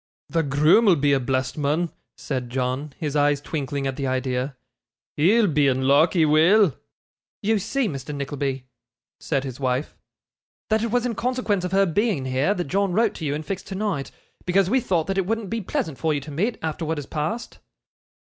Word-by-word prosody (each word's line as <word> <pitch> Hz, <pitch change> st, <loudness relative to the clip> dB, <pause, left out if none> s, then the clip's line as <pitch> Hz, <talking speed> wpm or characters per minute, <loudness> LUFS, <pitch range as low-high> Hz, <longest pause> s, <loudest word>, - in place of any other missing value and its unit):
'The 165 Hz, -, +1 dB
groom 150 Hz, +9 st, +4 dB
will 190 Hz, -4 st, +6 dB
be 145 Hz, -1 st, +2 dB
a 135 Hz, -, +3 dB
blessed 130 Hz, +2 st, -1 dB
mun,' 155 Hz, +4 st, 0 dB, 0.3 s
said 130 Hz, -3 st, -4 dB
John, 130 Hz, +3 st, -2 dB
his 150 Hz, -2 st, -3 dB
eyes 145 Hz, -1 st, +3 dB
twinkling 145 Hz, -1 st, -3 dB
at 135 Hz, 0 st, -2 dB
the 140 Hz, -2 st, -2 dB
idea. 130 Hz, +1 st, -1 dB, 0.6 s
'He'll 210 Hz, +9 st, +4 dB
be 150 Hz, -6 st, +2 dB
in 130 Hz, 0 st, +1 dB
luck, 145 Hz, +5 st, +4 dB
he 165 Hz, -4 st, +4 dB
will.' 160 Hz, -, +5 dB, 0.7 s
'You 215 Hz, +1 st, +2 dB
see, 230 Hz, +5 st, -1 dB
Mr. 140 Hz, -4 st, -5 dB
Nickleby,' 140 Hz, -2 st, -3 dB, 0.5 s
said 135 Hz, -, -1 dB
his 130 Hz, -2 st, -6 dB
wife, 130 Hz, +1 st, -1 dB, 0.7 s
'that 220 Hz, 0 st, +2 dB
it 230 Hz, -, -1 dB
was 245 Hz, +2 st, +1 dB
in 245 Hz, -, -1 dB
consequence 235 Hz, -4 st, -1 dB
of 180 Hz, -, -3 dB
her 195 Hz, +1 st, +4 dB
being 195 Hz, -, 0 dB
here, 130 Hz, +10 st, +1 dB
that 180 Hz, -, -1 dB
John 195 Hz, +4 st, 0 dB
wrote 225 Hz, +5 st, +2 dB
to 160 Hz, -, -6 dB
you 145 Hz, 0 st, 0 dB
and 155 Hz, +1 st, -5 dB
fixed 190 Hz, +3 st, -5 dB
tonight, 190 Hz, -7 st, -2 dB, 0.3 s
because 190 Hz, +1 st, +2 dB
we 260 Hz, -, +4 dB
thought 175 Hz, -9 st, 0 dB
that 195 Hz, 0 st, -1 dB
it 185 Hz, -, -1 dB
wouldn't 225 Hz, -2 st, -2 dB
be 230 Hz, 0 st, -1 dB
pleasant 160 Hz, -6 st, -3 dB
for 160 Hz, -2 st, +1 dB
you -, -, 0 dB
to 150 Hz, -, -9 dB
meet, 205 Hz, +11 st, -1 dB
after 160 Hz, +1 st, -3 dB
what 160 Hz, 0 st, -2 dB
has 145 Hz, -, -5 dB
passed. 160 Hz, -, -4 dB
155 Hz, 200 wpm, -24 LUFS, 140-195 Hz, 0.7 s, will